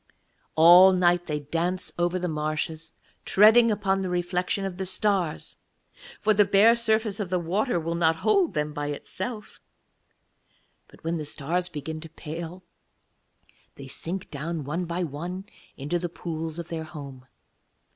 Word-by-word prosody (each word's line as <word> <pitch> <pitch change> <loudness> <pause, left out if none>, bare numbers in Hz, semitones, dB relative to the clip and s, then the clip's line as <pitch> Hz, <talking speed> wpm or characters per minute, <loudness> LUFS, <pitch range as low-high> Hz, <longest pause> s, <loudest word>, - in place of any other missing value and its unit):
All 175 +4 +8
night 175 -1 +2
they 150 -2 -2
dance 170 +5 -2
over 175 +1 +1
the 180 0 -2
marshes, 155 +1 -3 0.3
treading 220 +4 +6
upon 195 -2 0
the 185 - -2
reflection 180 +2 -1
of 185 -2 -5
the 190 - -3
stars 190 -4 -1 0.6
(for 215 - +3
the 205 0 +5
bare 205 +4 +5
surface 220 -3 +1
of 200 -4 -3
the 185 - +1
water 180 +5 0
will 165 +1 -3
not 165 -1 +2
hold 390 - +3
them 150 0 -1
by 145 -1 -3
itself); 190 +9 -5 1.3
but - - -20
when 165 +1 -1
the 155 - -4
stars 170 +5 -2
begin 155 0 -6
to 165 - -10
pale, 165 +3 -7 1.1
they 140 - -10
sink 175 +7 -5
down 155 +2 -4
one 160 +6 -3
by 175 +2 -2
one 175 +5 -5 0.3
into 150 +5 -2
the 175 0 -3
pools 160 -1 -5
of 170 -1 -6
their 165 -1 -4
home. 140 -5 -10
175 Hz, 155 wpm, -26 LUFS, 160-190 Hz, 1.3 s, All